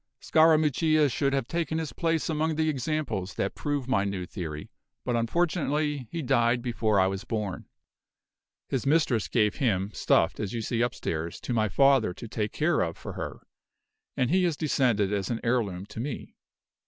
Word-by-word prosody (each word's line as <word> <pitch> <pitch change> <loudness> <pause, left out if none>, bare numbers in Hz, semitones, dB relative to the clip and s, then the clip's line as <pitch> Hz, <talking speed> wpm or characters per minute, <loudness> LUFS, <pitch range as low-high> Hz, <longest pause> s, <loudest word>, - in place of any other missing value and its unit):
"Scarammuccia 155 -1 +4
should 140 +4 +1
have 135 -3 -1
taken 160 0 -1
his 160 -2 -3
place 165 -2 0
among 160 0 0
the 155 0 +1
examples 125 - -2
that 100 - -1
prove 145 -3 -2
my 130 -7 +2
new 100 -2 -3
theory; 75 -5 -6 0.3
but 125 - 0
unfortunately 150 +1 0
he 170 -2 -3
died 120 -2 +2
before 110 -4 +1
I 95 - +5
was 95 0 -2
born. 105 -5 -4 1.0
His 135 0 -2
mistress 140 -8 +2
gave 105 -3 +1
him, 105 -7 0
stuffed, - - +2
as 100 -3 -3
you 115 - -2
see 115 +1 -1
upstairs, 85 -9 -2
to 125 - -3
my 110 -2 +1
father 135 -9 +4
to 115 - -8
take 105 -1 -2
care 155 +1 +1
of 85 -1 -2
for - - -7
her, - - -6 0.8
and 125 +1 +1
he 185 +1 +3
has 165 -4 0
descended 120 - +1
as 100 -2 -1
an 115 -2 -1
heirloom 105 -7 0
to 105 +2 -9
me. 130 +2 -5
125 Hz, 175 wpm, -27 LUFS, 105-150 Hz, 1.0 s, I